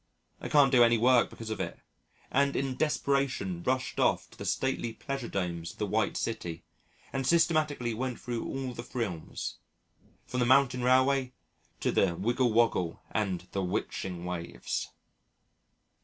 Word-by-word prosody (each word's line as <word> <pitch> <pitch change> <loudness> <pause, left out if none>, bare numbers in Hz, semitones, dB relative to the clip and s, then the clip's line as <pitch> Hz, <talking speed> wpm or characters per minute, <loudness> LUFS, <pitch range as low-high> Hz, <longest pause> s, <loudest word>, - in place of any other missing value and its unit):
I - - -5
can't 140 -3 +5
do 125 -3 +7
any 115 0 +5
work 125 +1 +4
because 110 -1 -8
of 110 - -3
it, - - -4 0.5
and 140 +1 +2
in 135 -1 -1
desperation 135 - 0
rushed 130 +5 -1
off - - +2
to - - -16
the - - -5
stately 130 -3 -1
pleasure 135 +1 -4
domes 85 -3 -3
of - - -22
the - - -1
White - - 0
City, 85 -1 -3 0.5
and 135 -1 -1
systematically 155 -7 +2
went 125 +2 -3
through 120 -2 -3
all 135 -2 -3
the 120 - -6
thrills 110 -10 -4 0.7
from 125 - -3
the 125 - +3
Mountain 130 -1 +4
Railway 130 +1 +3 0.5
to - - +1
the 90 -3 +2
Wiggle 120 +5 +1
Woggle 110 -7 +2
and 95 -4 -1
the 100 - -1
'Witching 90 -2 -3
Waves. 85 -8 -4
120 Hz, 155 wpm, -30 LUFS, 95-135 Hz, 0.7 s, do